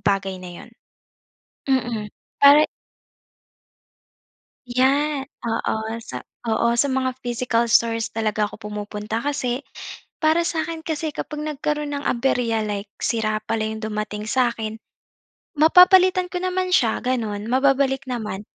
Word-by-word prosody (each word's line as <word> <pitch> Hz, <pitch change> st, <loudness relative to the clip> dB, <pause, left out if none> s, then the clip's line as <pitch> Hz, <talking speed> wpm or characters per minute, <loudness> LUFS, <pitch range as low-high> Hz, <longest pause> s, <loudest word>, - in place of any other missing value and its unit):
bagay 195 Hz, -2 st, -1 dB
na 180 Hz, -1 st, -9 dB
'yon. -, -, -18 dB, 1.0 s
Mm, 240 Hz, -5 st, 0 dB, 0.3 s
para. 285 Hz, +2 st, +7 dB, 2.0 s
Yan, 270 Hz, +3 st, +2 dB, 0.2 s
oo 225 Hz, -1 st, -2 dB
sa 125 Hz, -1 st, -6 dB, 0.2 s
oo, 230 Hz, +1 st, +2 dB
sa 285 Hz, -, +4 dB
mga 260 Hz, -1 st, -1 dB
physical 240 Hz, -1 st, 0 dB
stores 230 Hz, -1 st, +2 dB
talaga 215 Hz, -1 st, 0 dB
ako 210 Hz, 0 st, -8 dB
pumupunta 210 Hz, +1 st, -4 dB
kasi, 260 Hz, -1 st, -2 dB, 0.6 s
para 320 Hz, +2 st, +3 dB
sa'kin 325 Hz, 0 st, -2 dB
kasi 315 Hz, 0 st, -2 dB
kapag 300 Hz, +1 st, -5 dB
nagkaroon 300 Hz, 0 st, -2 dB
ng 280 Hz, -, -7 dB
aberya, 235 Hz, -3 st, +1 dB
like, 205 Hz, -1 st, -4 dB
sira 215 Hz, -2 st, 0 dB
pala 225 Hz, -1 st, 0 dB
'yong 220 Hz, 0 st, -4 dB
dumating 215 Hz, -1 st, -4 dB
sa'kin, 230 Hz, -4 st, 0 dB, 0.8 s
mapapalitan 365 Hz, +3 st, +6 dB
ko 360 Hz, -, -2 dB
naman 370 Hz, 0 st, -1 dB
siya, 230 Hz, -8 st, +3 dB
gano'n, 220 Hz, -5 st, -2 dB
mababalik 270 Hz, 0 st, +2 dB
naman. 215 Hz, -5 st, -4 dB
240 Hz, 120 wpm, -22 LUFS, 220-290 Hz, 2.0 s, para